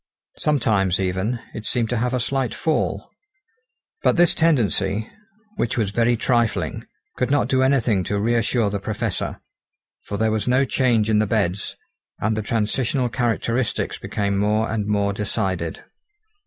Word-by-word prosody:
Sometimes, 105 - +2
even, 95 +6 -1
it 110 -1 -6
seemed 115 -2 0
to 120 - +1
have 125 +2 0
a - - 0
slight 130 +1 -1
fall. 160 -1 -1 0.9
But - - +3
this 175 -1 +5
tendency, 110 - +1 0.5
which 115 - -1
was 105 -4 0
very 120 +2 +2
trifling, 120 -2 0 0.3
could 125 - 0
not 145 -3 +2
do 130 0 +2
anything 125 -7 +2
to 105 - -1
reassure 115 0 +1
the 100 - -2
Professor; 105 +1 -3 0.6
for 100 - -4
there 110 +1 +1
was 110 +1 -1
no 130 +2 +3
change 120 -5 +2
in 110 -1 +3
the 110 - +2
beds, 100 -2 -1 0.4
and 110 +1 0
the 110 - -1
transitional 120 +4 0
characteristics 120 0 -1
became 100 -1 -1
more 105 +2 +1
and 105 -2 -1
more 100 -1 +1
decided. 95 -5 -2
110 Hz, 150 wpm, -22 LUFS, 100-125 Hz, 0.9 s, this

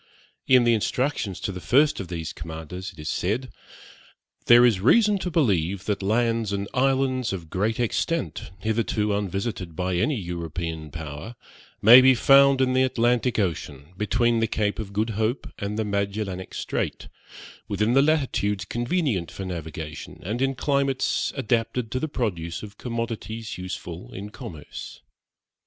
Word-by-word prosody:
In 130 -2 +6
the 120 0 +4
instructions 115 -3 -1
to - - -2
the 90 -1 -7
first 145 +8 +3
of 95 - -5
these 85 -2 -5
commanders 80 +3 -7
it 90 - -21
is 75 -1 -7
said, 110 +11 -1 1.0
'there 120 +1 +8
is 110 -6 +3
reason 210 - +4
to 180 - -3
believe 100 - +1
that 105 -1 -1
lands 115 +1 +1
and 100 0 -2
islands 130 -1 +1
of 85 -5 -6
great 105 +5 0
extent, 120 - -1
hitherto 110 0 0
unvisited 100 -3 -3
by 90 +1 -1
any 150 +11 +1
European 85 -4 -4
power, 80 +8 -7 0.5
may 120 +5 +10
be 130 0 +6
found 135 +2 +6
in 130 -1 +2
the 130 - +3
Atlantic 125 -1 +2
Ocean, 80 -5 -3
between 115 +3 +1
the 115 - +2
Cape 105 -1 -1
of 105 -3 -5
Good 110 +3 -1
Hope 110 +4 -1
and 100 +1 -3
the 110 - 0
Magellanic 100 -2 -3
Strait, - - -3 0.6
within 105 +3 +1
the 135 - +6
latitudes 130 - +1
convenient 120 - -1
for 95 - -7
navigation, 80 -4 -6
and 110 +7 -3
in 135 0 +1
climates 140 +1 0
adapted 115 -1 -1
to 130 - -1
the 155 - -2
produce 85 - -3
of 105 -1 -10
commodities 115 -3 -4
useful 90 -1 -7
in 100 +2 -7
commerce.' 90 - -9
105 Hz, 150 wpm, -25 LUFS, 90-125 Hz, 1.0 s, may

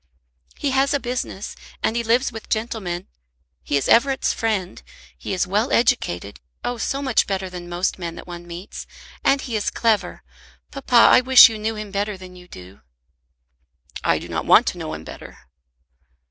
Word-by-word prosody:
"He 280 - -1
has 275 +2 +2
a - - +1
business, 245 -6 -5 0.3
and 220 - 0
he 235 - 0
lives 240 +3 +2
with 225 0 -10
gentlemen. 215 -6 -3 0.6
He 145 - 0
is 140 - -1
Everett's 270 +3 +3
friend. 210 - -2 0.3
He 60 - -7
is - - 0
well - - 0
educated; 90 +4 0 0.2
oh, 245 -1 -3
so 275 +5 -2
much 260 -4 +2
better 190 -1 -3
than 175 -1 -8
most 175 +2 -2
men 170 -2 -5
that - - -10
one 175 -1 -9
meets. 175 +3 -8 0.4
And 275 0 +3
he 240 -4 -5
is 210 - 0
clever. 225 -3 0 0.5
Papa, 275 -3 -3
I 235 - +7
wish 255 -1 +9
you 220 -1 -6
knew 220 +1 -2
him 210 -1 -7
better 200 0 -2
than 185 -1 -12
you 180 0 -14
do." 90 - -13 1.2
"I - - +2
do - - -8
not - - -4
want - - +7
to - - -8
know 80 - -5
him 80 - -9
better." - - -11
210 Hz, 180 wpm, -22 LUFS, 175-240 Hz, 1.2 s, wish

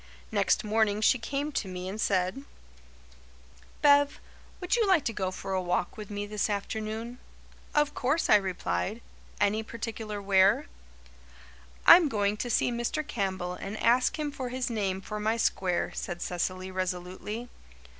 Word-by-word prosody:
Next - - +2
morning 215 -1 +1
she 230 +3 +4
came 280 +5 -3
to 220 - -2
me 180 0 -5
and 205 +3 -4
said: 185 +7 0 1.4
"Bev, 285 0 +5 0.4
would 360 +3 0
you 455 -3 +2
like 370 -7 +4
to 230 - -1
go 190 -3 -1
for 190 +1 -5
a 190 - +1
walk 175 0 -1
with 210 -2 -8
me 205 0 -4
this 210 +1 -1
afternoon?" 220 +4 -4 0.6
"Of 295 -1 +3
course," 285 +6 0
I - - +7
replied. 185 - -2 0.4
"Any 205 +1 +2
particular 220 -2 -5
where?" 195 0 +4 1.2
"I'm 340 -4 +9
going 205 -3 +1
to 245 - -3
see 240 - +2
Mr. 240 +6 -2
Campbell 190 -7 -2
and 195 +3 -6
ask 245 +6 +3
him 300 -1 -2
for 260 -3 -5
his 250 -1 -2
name 195 -4 -1
for 210 +2 -5
my 220 +2 0
square," 185 -5 0
said 175 -1 -4
Cecily 185 +1 -3
resolutely. 185 +5 -4
210 Hz, 155 wpm, -29 LUFS, 190-245 Hz, 1.4 s, I'm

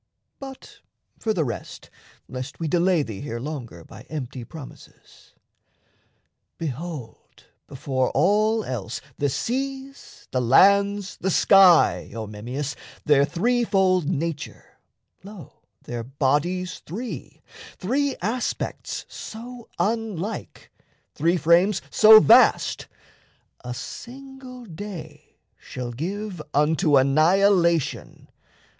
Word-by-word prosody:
But 270 -1 -11 0.4
for 225 - -1
the 180 -7 0
rest, 120 -5 -7 0.4
lest 130 +2 -7
we 165 - -2
delay 175 0 +2
thee 110 -7 -7
here 120 -5 -5
Longer 120 - -7
by 100 - -13
empty 130 -4 -6
promises 140 +3 -14 1.2
behold, 150 -5 -7 0.2
Before 130 -1 -2
all 215 +8 +2
else, 115 - -5 0.2
the 145 - +1
seas, 270 - -5
the 130 - 0
lands, 200 - +3
the 190 - -2
sky: 190 -2 +5
O 110 -1 -4
Memmius, 125 +7 -5 0.3
their 140 -2 +4
threefold 190 -4 +1
nature, 165 -3 -5 0.4
lo, 195 - -12 0.2
Their 120 -1 -5
bodies 150 +8 -1
three, 160 - -7 0.3
three 275 +8 0
aspects 235 +5 -3
so 235 +1 -9
unlike, 220 -2 -3 0.4
Three 170 +4 +1
frames 175 +4 +3
so 220 0 +9
vast, 145 - +4 0.8
a 125 0 -5
single 255 - -10
day 190 -1 -10 0.2
shall 125 -2 -7
give 185 - -5
Unto 150 0 +3
annihilation! 170 +4 +2
170 Hz, 100 wpm, -24 LUFS, 140-210 Hz, 1.2 s, so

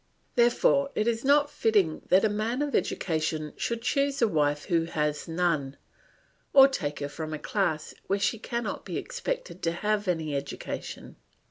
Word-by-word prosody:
Therefore 245 +3 +3
it 215 - +1
is 230 0 0
not 290 +1 +4
fitting 205 - +2
that 190 +3 +5
a - - +5
man 220 +6 -1
of 290 - -3
education 155 -2 -1
should 235 -1 -3
choose 275 +2 +1
a 230 - +4
wife 150 -4 +1
who 165 -3 +1
has 150 -2 -2
none, 160 -5 0 0.8
or 270 -1 +9
take 150 - -3
her 145 - -1
from 155 +1 -5
a - - -4
class 155 -3 -1
where 195 - +1
she 205 +3 0
cannot 235 -2 -3
be - - -4
expected - - -4
to 165 - +1
have 210 +3 -1
any 160 -4 -1
education. 140 0 -6
200 Hz, 165 wpm, -28 LUFS, 155-235 Hz, 0.8 s, or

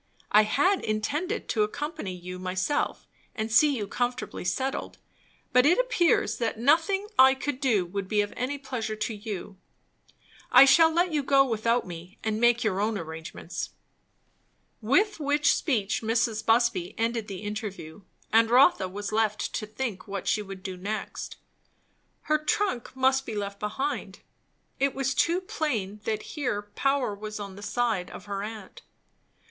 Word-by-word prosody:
I 210 - +7
had 290 - +2
intended 290 - -2
to 220 - +1
accompany 210 - -3
you 180 +1 -8
myself 185 +8 -1 0.3
and 220 -1 -3
see 285 +5 +5
you 205 -3 -3
comfortably 245 +4 -3
settled; 265 +9 -2 0.6
but 250 0 +6
it 325 +6 +5
appears - - +2
that 230 -2 -1
nothing 330 - +2
I 265 +1 +8
could 275 0 -3
do 230 -10 +2
would 195 +2 -4
be 210 +1 +2
of 205 - -4
any 260 +4 -2
pleasure 250 -5 -4
to 220 +2 -3
you. 205 -2 -6 0.9
I - - +9
shall 325 +4 +6
let 345 +2 +2
you 295 - +2
go 275 0 +4
without 230 0 +1
me 175 +2 -9
and 220 0 -1
make 240 0 +4
your 200 -3 0
own 215 0 0
arrangements." 160 -1 -6 1.1
With 390 - +2
which 290 -1 +3
speech 215 -9 0
Mrs. 225 -1 0
Busby 225 -6 +2
ended 230 -1 -1
the 195 -1 -7
interview; 205 -5 -6 0.3
and 225 0 +5
Rotha 255 - +5
was 205 +3 -5
left 215 -1 0
to 215 - -3
think 215 -4 -5
what 200 -2 -5
she 215 - +2
would 195 -2 -9
do 190 -2 -5
next. 205 +4 -5 0.9
Her 305 0 +2
trunk 305 - -1
must 265 0 +3
be 225 - -6
left 200 -1 -4
behind. 265 +8 -3 0.6
It 275 -1 +1
was 270 -1 0
too 340 +6 +2
plain 225 - -2
that 215 -1 -1
here 245 -9 -2
power 275 -5 +1
was 215 +1 -7
on 200 -2 -7
the 200 - -10
side 220 -4 -1
of - - -10
her 200 -1 -4
aunt. 210 -2 -8
225 Hz, 160 wpm, -27 LUFS, 205-275 Hz, 1.1 s, I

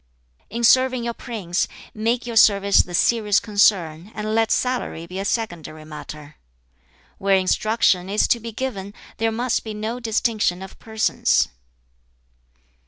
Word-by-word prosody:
"In 235 +1 -4
serving 255 0 +4
your 235 0 -2
prince, 205 -9 -3 0.3
make 230 +3 -1
your 235 -1 -5
service 200 -2 +5
the 175 - -5
serious 210 0 +3
concern, 195 -4 +1
and 215 0 -3
let 225 0 +2
salary 250 -10 -1
be 180 +2 -7
a 195 - -3
secondary 170 - -4
matter. 150 -1 -10 0.8
"Where 195 0 +3
instruction 190 -1 +1
is 205 +2 +2
to 235 - +3
be 230 +1 -7
given, 205 -5 -5 0.2
there 225 0 0
must 240 +2 -1
be 220 -1 -6
no 220 +3 -4
distinction 220 -5 0
of 190 - -12
persons. 220 -1 +1
215 Hz, 140 wpm, -22 LUFS, 190-230 Hz, 0.8 s, service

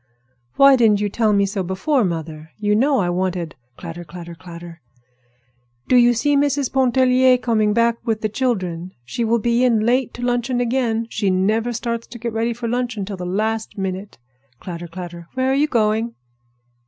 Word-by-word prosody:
"Why 275 0 +7
didn't 220 -5 +4
you 205 0 0
tell 220 +1 +1
me 200 -1 +3
so 195 0 -3
before, 195 - 0
mother? 160 -3 -4
You 210 -1 0
know 270 +6 +3
I 180 -6 +1
wanted—" 180 -3 -2 0.2
Clatter, 170 0 -7
clatter, 170 +1 -9
clatter! 170 -1 -11 1.1
"Do - - +3
you 240 0 +5
see 290 +5 +2
Mrs. 280 -1 +1
Pontellier 255 -1 +4
starting 220 -4 +1
back 230 +1 +2
with 220 -2 -1
the 215 - +1
children? 185 -7 -2
She 235 - -3
will 230 +1 +2
be 235 +2 +1
in 235 -4 +3
late 245 +1 +2
to 245 - -7
luncheon 245 0 0
again. 235 -2 0
She 200 - 0
never 215 +6 +1
starts 235 0 -3
to 240 - -10
get 235 -1 -4
ready 225 +1 0
for 235 0 -4
luncheon 240 -4 -2
till 200 0 -5
the 180 -1 -5
last 220 +4 -2
minute." 190 +1 -4 0.4
Clatter, 175 -1 -7
clatter! 170 -1 -8
"Where 260 0 +1
are - - +2
you 290 +3 +2
going?" 225 -2 0
225 Hz, 180 wpm, -20 LUFS, 185-245 Hz, 1.1 s, Why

